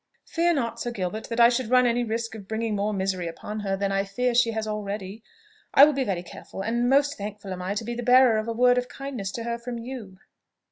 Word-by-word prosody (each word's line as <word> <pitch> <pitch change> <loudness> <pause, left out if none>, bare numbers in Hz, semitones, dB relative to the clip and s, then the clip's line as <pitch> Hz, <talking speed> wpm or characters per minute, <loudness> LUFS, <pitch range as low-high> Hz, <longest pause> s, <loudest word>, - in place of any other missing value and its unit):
"Fear 340 0 +1
not, 235 -5 -2
Sir 240 - -2
Gilbert, 210 -1 -4
that 230 0 -3
I 235 0 +8
should 245 -1 -1
run 250 0 +5
any 240 0 +2
risk 230 0 -3
of 205 -3 -10
bringing 220 0 -2
more 205 +1 0
misery 190 -3 -1
upon 210 +6 -6
her 195 -2 -2
than, 200 0 -1
I 195 0 +1
fear, 245 +6 -1
she 235 0 +4
has 220 -1 -3
already. 205 0 -5 0.5
I 280 - +10
will 300 - +2
be 275 -1 0
very 185 -7 -2
careful, 190 +2 -8
and 235 +3 0
most 280 0 +3
thankful 200 -1 -6
am 180 - -6
I 190 +3 -2
to 215 - -2
be 240 - -3
the 240 - -4
bearer 245 -2 +5
of 215 - -4
a - - -1
word 245 +2 +4
of 250 0 -6
kindness 260 -8 -5
to 230 - -4
her 235 0 -3
from 240 0 -5
you!" 230 -5 -8
230 Hz, 250 wpm, -25 LUFS, 200-245 Hz, 0.5 s, I